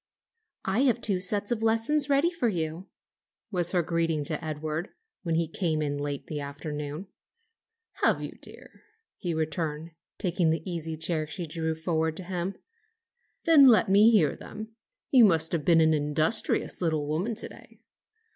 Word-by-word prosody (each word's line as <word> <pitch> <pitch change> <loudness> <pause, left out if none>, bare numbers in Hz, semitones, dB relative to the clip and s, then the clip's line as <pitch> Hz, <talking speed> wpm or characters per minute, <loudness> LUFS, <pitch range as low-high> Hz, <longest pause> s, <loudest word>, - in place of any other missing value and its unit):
"I 190 +4 0
have 245 -3 +2
two 200 -5 0
sets 205 +3 0
of 230 -2 -1
lessons 230 +7 +2
ready 285 +5 +3
for 295 -9 0
you," 165 0 -4 0.6
was 175 -3 +1
her 180 -2 +1
greeting 165 -2 -1
to 155 +2 -2
Edward, 155 +2 -4 0.3
when 165 -3 -1
he 165 0 +1
came 165 -1 -1
in 145 -1 -2
late 145 -1 -3
in - - -35
the 150 - -5
afternoon. 150 +4 -6 0.9
"Have - - +3
you, - - -6
dear?" - - -12 0.3
he 175 -4 -3
returned, 160 0 -3 0.3
taking 175 -2 +1
the 160 +1 -2
easy 165 -3 -4
chair 160 -1 -1
she 170 +3 -5
drew 160 0 -3
forward 160 -1 -1
for 185 - -4
him. 180 +1 -4 0.9
"Then 305 -5 +7
let 225 -5 +5
me 205 +3 +6
hear 195 -11 +3
them. 220 +1 -9 0.4
You 255 -3 +7
must 165 -6 +4
have 165 -4 -1
been 165 -2 +5
an 160 0 +4
industrious 155 +8 +1
little 155 -4 0
woman 175 +10 -2
to 225 - -4
day." - - -16
165 Hz, 165 wpm, -27 LUFS, 155-200 Hz, 0.9 s, Then